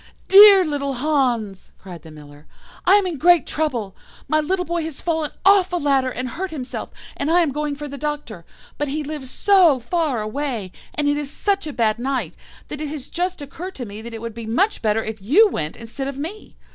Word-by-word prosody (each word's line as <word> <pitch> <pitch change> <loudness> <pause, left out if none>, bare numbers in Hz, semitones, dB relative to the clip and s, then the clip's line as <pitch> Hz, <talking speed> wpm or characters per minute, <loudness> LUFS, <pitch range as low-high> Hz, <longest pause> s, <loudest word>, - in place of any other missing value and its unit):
"'Dear 395 -1 +9
little 280 -3 -2
Hans,' 245 -8 -1
cried 180 -4 -11
the 160 - -13
Miller, 150 0 -14 0.4
'I 380 - +7
am 410 -2 +3
in 350 -4 -3
great 345 +1 +5
trouble. 245 -11 -2 0.3
My 310 - +2
little 360 +4 -1
boy 340 0 -2
has 315 -4 -6
fallen 320 -3 -1 0.2
off 390 -2 +5
a - - -1
ladder 275 -5 +1
and 255 0 -4
hurt 370 +9 -4
himself, 275 -6 -6 0.3
and 280 - -2
I 350 +2 +4
am 320 -4 +1
going 295 +1 -2
for 295 +1 -7
the 280 -1 -8
Doctor. 295 - -5 0.4
But 295 - -1
he 300 +2 -3
lives 290 -3 -6
so 360 -6 +4
far 295 0 -1
away, 230 -4 -4 0.2
and 295 -1 0
it 290 0 +2
is 295 -2 -4
such 390 +2 -1
a - - -4
bad 225 -2 +1
night, 245 - -2 0.4
that 300 - -6
it 305 - -3
has 290 -2 -7
just 355 -2 -3
occurred 355 +7 -8
to 250 - -6
me 205 0 -9
that 230 0 -8
it 225 - -8
would 230 -1 -5
be 230 0 -8
much 380 - +1
better 220 0 +1
if 220 -2 -6
you 320 - +5
went 155 - -4
instead 235 +4 -6
of 275 -1 -5
me. 335 +9 -7
285 Hz, 220 wpm, -21 LUFS, 235-330 Hz, 0.4 s, Dear